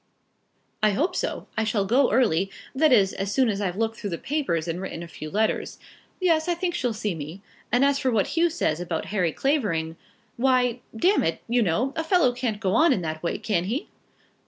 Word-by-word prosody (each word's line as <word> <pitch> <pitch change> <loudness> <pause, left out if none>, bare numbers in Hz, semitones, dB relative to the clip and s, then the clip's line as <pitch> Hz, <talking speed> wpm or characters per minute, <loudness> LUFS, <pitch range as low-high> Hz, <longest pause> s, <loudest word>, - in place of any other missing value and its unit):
"I 215 -1 +3
hope 335 - 0
so. - - -2
I 220 - +1
shall 215 -2 0
go 250 +6 +3
early, 195 -7 +2 0.2
that 300 +2 +3
is, 200 -6 +4
as 195 +1 -3
soon 260 +1 +3
as 205 -1 -2
I've 185 -3 -1
looked 225 0 -1
through 205 - -4
the 170 - -3
papers 250 - -1
and 170 +2 -3
written 170 -3 -5
a - - -8
few 155 -2 -8
letters. 215 +5 -1 0.4
Yes, 335 -3 +2
I 350 - +1
think 345 0 -2
she'll 250 -8 -1
see 210 -3 -2
me. 160 +5 -8 0.3
And 245 +4 +4
as 280 0 +2
for 265 - +1
what 220 -5 +1
Hugh 340 +1 +2
says 240 - -1
about 170 -2 -3
Harry 180 -5 +1
Clavering, 170 - -1 0.4
why, 250 -1 +2 0.2
d 345 +12 +3
it, 410 - +1
you 240 +1 +2
know, 225 +8 +1
a 320 - -1
fellow 320 -7 +3
can't 240 -4 -2
go 195 -3 0
on 315 +5 +5
in 185 - -2
that 155 -1 -4
way; 170 - -1
can 190 -6 -1
he?" 240 - -3
225 Hz, 215 wpm, -25 LUFS, 185-270 Hz, 0.4 s, on